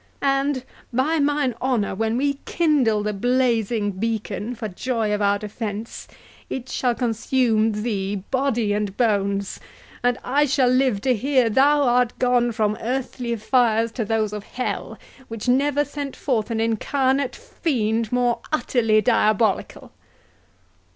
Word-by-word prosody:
And 275 -1 +1 0.3
by 280 +7 +1
mine 290 -3 +1
honour, 250 -6 0
when 225 +3 -1
we 280 +1 0
kindle 270 -11 +2
the 210 0 -1
blazing 230 -2 +1
beacon, 215 +2 -3
for 220 -1 -4
joy 220 +2 -2
of 210 - -1
our 200 0 +3
defence, 210 +1 -6 0.4
it 260 -1 -5
shall 245 -2 0
consume 225 -2 +1
thee, 200 -3 -2 0.2
body 240 -6 +1
and 205 -1 -2
bones; 200 -4 0 0.4
and 245 0 +1
I 285 +4 +2
shall 265 -2 +3
live 255 -5 +2
to 260 +2 +2
hear 255 0 +2
thou 285 +5 +4
art 245 -1 +2
gone 245 -1 +2
from 215 -1 -1
earthly 245 -1 -2
fires 230 0 +2
to 230 - -3
those 215 -1 -1
of 210 - -4
that - - -22
hell, 250 - -3 0.3
which 225 +1 -6
never 285 +3 +2
sent 285 -1 -6
forth 235 -6 -1
an 225 -1 -2
incarnate 260 +4 0
fiend 230 - -2
more 245 -1 +1
utterly 225 -8 +2
diabolical!" 215 -3 +1
235 Hz, 140 wpm, -22 LUFS, 215-260 Hz, 0.4 s, thou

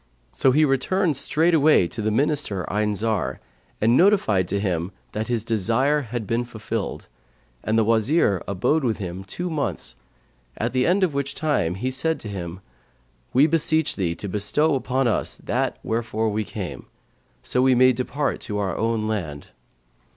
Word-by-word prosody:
So 60 - +3
he 155 +4 +4
returned 150 +5 +1
straightway 155 - +3
to 110 - -5
the 110 - 0
Minister 120 - 0
Ayn 105 +1 0
Zar 105 - -1 0.4
and 115 +3 +3
notified 150 - +3
to 100 +3 -1
him 90 -2 -1 0.2
that 110 +1 -3
his 115 -3 -1
desire 115 +7 +1
had 120 -3 -5
been 115 +4 0
fulfilled; 115 -2 -5 0.6
and 110 +1 +1
the 115 - +4
Wazir, 110 - +2
abode 120 - +1
with 115 -4 0
him 95 -2 -6
two 175 - -5
months, 150 - -2 0.6
at 115 +2 -2
the 130 -1 +2
end 190 +3 +3
of 175 -5 +1
which 140 0 -3
time 145 - 0
he 125 +7 -2
said 160 +5 0
to - - -7
him, 90 -2 -6 0.7
'We 135 +4 +5
beseech 160 -1 +2
thee 85 -4 -1
to 100 - -6
bestow 105 +11 +1
upon 130 -1 0
us 115 - -1
that - - -2
wherefore 110 -1 -1
we 105 0 -2
came, - - -6 0.6
so 125 - +1
we 130 0 +4
may 130 +1 +5
depart 135 +4 -2
to 105 -3 -4
our 95 -4 -1
own 115 -1 0
land.' 80 -10 -4
115 Hz, 165 wpm, -23 LUFS, 105-140 Hz, 0.7 s, We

